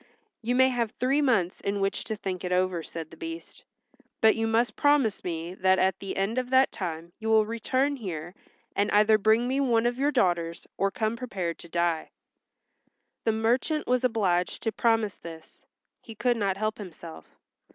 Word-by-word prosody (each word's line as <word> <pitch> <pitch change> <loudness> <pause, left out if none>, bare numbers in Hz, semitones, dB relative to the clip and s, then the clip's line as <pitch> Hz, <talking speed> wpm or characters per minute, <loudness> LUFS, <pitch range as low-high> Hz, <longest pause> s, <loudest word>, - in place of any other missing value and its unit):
"You 240 +2 0
may 260 +1 +5
have 240 -3 -1
three 270 +4 +2
months 225 -11 +1
in 200 0 -1
which 195 0 -1
to 220 - -3
think 190 -3 -5
it 180 - -3
over," 180 -1 +1
said 165 -1 -8
the - - -11
Beast. 330 0 -8 0.6
"But 220 0 +5
you 225 0 0
must 230 +2 +1
promise 285 -7 +2
me 170 0 -4
that 190 0 +3
at 190 0 +1
the 195 - -5
end 205 +6 0
of 250 -1 -4
that 260 +1 +4
time 170 -2 -5
you 220 0 -3
will 220 -1 +5
return 255 +5 0
here 175 -6 -6 0.4
and 205 - +1
either 215 +1 +5
bring 220 +3 +3
me 265 +2 0
one 240 -4 +2
of 240 +1 0
your 285 +2 +3
daughters 175 - 0
or 195 - +1
come 220 +2 -1
prepared 190 -9 -4
to 170 - -12
die." 170 -1 0 1.2
The 225 - +4
merchant 245 +8 0
was 250 0 +1
obliged 190 -7 0
to 225 - 0
promise 225 -3 +1
this; 165 -1 -12 0.3
he 225 - -11
could 240 +3 +1
not 200 -4 -1
help 215 +1 -2
himself. 155 - -11
215 Hz, 185 wpm, -27 LUFS, 185-245 Hz, 1.2 s, may